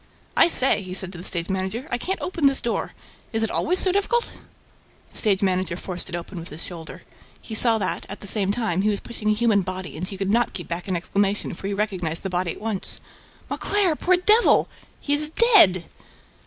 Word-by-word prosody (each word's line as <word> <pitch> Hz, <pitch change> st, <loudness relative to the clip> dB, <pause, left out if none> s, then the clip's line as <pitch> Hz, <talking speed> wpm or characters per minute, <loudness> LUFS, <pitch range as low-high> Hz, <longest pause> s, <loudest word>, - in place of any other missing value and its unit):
"I -, -, +6 dB
say," 270 Hz, -9 st, +2 dB
he 185 Hz, -1 st, -6 dB
said 190 Hz, -1 st, -4 dB
to 175 Hz, -, -8 dB
the -, -, -8 dB
stage 170 Hz, -2 st, 0 dB
manager, 190 Hz, +8 st, -3 dB
"I 245 Hz, -, -1 dB
can't 380 Hz, +9 st, -2 dB
open 335 Hz, -6 st, +1 dB
this 275 Hz, -1 st, +3 dB
door: 235 Hz, -, -2 dB, 0.4 s
is 225 Hz, -1 st, 0 dB
it 225 Hz, -, -1 dB
always 360 Hz, +3 st, +1 dB
so 375 Hz, -, +4 dB
difficult?" 405 Hz, +5 st, 0 dB, 0.8 s
The -, -, -12 dB
stage 200 Hz, -3 st, +2 dB
manager 185 Hz, -2 st, 0 dB
forced 180 Hz, 0 st, -5 dB
it 175 Hz, -, -4 dB
open 175 Hz, +1 st, -6 dB
with 165 Hz, -, -9 dB
his 150 Hz, +3 st, -5 dB
shoulder. 165 Hz, -3 st, -8 dB, 0.4 s
He 225 Hz, -, -9 dB
saw 225 Hz, 0 st, +5 dB
that, 190 Hz, -4 st, -2 dB
at 200 Hz, -, -7 dB
the -, -, -10 dB
same 200 Hz, -1 st, +1 dB
time, 205 Hz, -5 st, 0 dB
he 210 Hz, -, +2 dB
was 205 Hz, -, 0 dB
pushing 215 Hz, -3 st, -3 dB
a -, -, +4 dB
human 220 Hz, -2 st, +3 dB
body 185 Hz, -2 st, -5 dB
and 175 Hz, +4 st, -3 dB
he 195 Hz, -, -5 dB
could 195 Hz, +1 st, -1 dB
not 235 Hz, +2 st, +2 dB
keep 175 Hz, -, -6 dB
back 170 Hz, +2 st, -4 dB
an 185 Hz, -, 0 dB
exclamation, 200 Hz, +3 st, -1 dB
for 195 Hz, -, -6 dB
he 200 Hz, -, -2 dB
recognized 185 Hz, -6 st, -2 dB
the 195 Hz, -, -3 dB
body 180 Hz, 0 st, 0 dB
at -, -, -5 dB
once: 215 Hz, -3 st, -2 dB, 0.5 s
"Mauclair! 395 Hz, -6 st, +1 dB
Poor 365 Hz, +4 st, +2 dB
devil! 425 Hz, +6 st, +5 dB, 0.3 s
He 285 Hz, -, -1 dB
is 300 Hz, +1 st, +1 dB
dead!" 320 Hz, -, +5 dB
200 Hz, 220 wpm, -23 LUFS, 185-245 Hz, 0.8 s, I